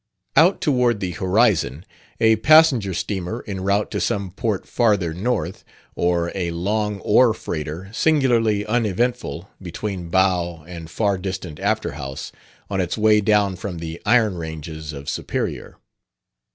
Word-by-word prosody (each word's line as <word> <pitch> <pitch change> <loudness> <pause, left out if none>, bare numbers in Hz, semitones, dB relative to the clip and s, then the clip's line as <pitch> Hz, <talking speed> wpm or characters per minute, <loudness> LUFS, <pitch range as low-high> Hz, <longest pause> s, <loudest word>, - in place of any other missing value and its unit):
Out 175 +5 +5
toward 125 -6 +2
the 95 -2 -3
horizon 95 - +1 0.3
a 110 -1 +4
passenger 140 -5 +5
steamer 95 +5 -3
en 95 -3 -5
route 100 +2 0
to - - -2
some 100 -2 -1
port 100 +1 -2
farther 100 -8 +1
north, 95 -1 -2 0.3
or 85 -1 0
a 90 -3 -2
long 105 +4 -1
ore 110 +3 +4
freighter, 80 +2 -5
singularly 115 -8 +2
uneventful 115 -3 -1
between 90 0 -5
bow 90 -3 +1
and 85 -2 -8
far 100 +1 0
distant 95 -4 -5
afterhouse, 75 -10 -3 0.4
on 95 -1 -1
its 90 +3 -2
way 105 -1 +4
down 105 -2 +2
from 90 -1 -6
the 80 0 -6
iron 110 -4 +3
ranges 80 -1 -6
of 70 -1 -9
Superior. - - -4
100 Hz, 135 wpm, -22 LUFS, 85-110 Hz, 0.4 s, Out